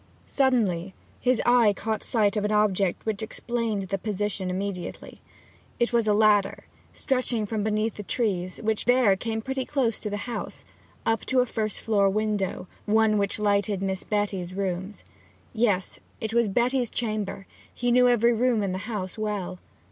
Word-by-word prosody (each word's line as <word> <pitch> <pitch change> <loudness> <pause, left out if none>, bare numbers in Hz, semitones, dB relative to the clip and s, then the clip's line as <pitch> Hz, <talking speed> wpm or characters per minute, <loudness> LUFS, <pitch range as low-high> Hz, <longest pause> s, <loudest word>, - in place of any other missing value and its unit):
Suddenly 200 -10 +1 0.2
his 250 -2 +1
eye 240 -4 +5
caught 220 +1 -3
sight 215 -2 +2
of 210 - 0
an 210 - 0
object 200 -3 +1
which 220 -2 -2
explained 225 -2 -2
the 195 - -1
position 205 -2 -2
immediately. 185 -1 -5 0.6
It 240 0 +1
was 230 -2 +2
a 210 - +4
ladder 210 -2 +3 0.3
stretching 250 -4 0
from 210 0 -2
beneath 215 +1 0
the - - -4
trees, 190 -4 -1
which 220 -1 +1
there 245 -5 +4
came 220 +2 -3
pretty 265 +1 -2
close 255 -5 0
to 210 - -4
the 205 - -3
house, 245 - -6 0.4
up 225 0 +1
to 260 -1 +3
a - - +1
first 215 -3 -3
floor 200 -3 +2
window 210 -2 -1 0.2
one 215 0 +3
which 200 -1 0
lighted 205 -1 +1
Miss 190 -1 -2
Betty's 195 -4 -2
rooms. 190 +1 -3 0.5
Yes, 210 -5 0 0.2
it 220 -2 -4
was 235 -1 +3
Betty's 245 +3 +1
chamber; 215 -4 -3 0.3
he 245 0 -1
knew 250 +1 +5
every 240 -1 +4
room 235 -2 +2
in 195 - -1
the 185 - -3
house 205 -1 -4
well. 205 -4 -3
215 Hz, 165 wpm, -26 LUFS, 200-235 Hz, 0.6 s, eye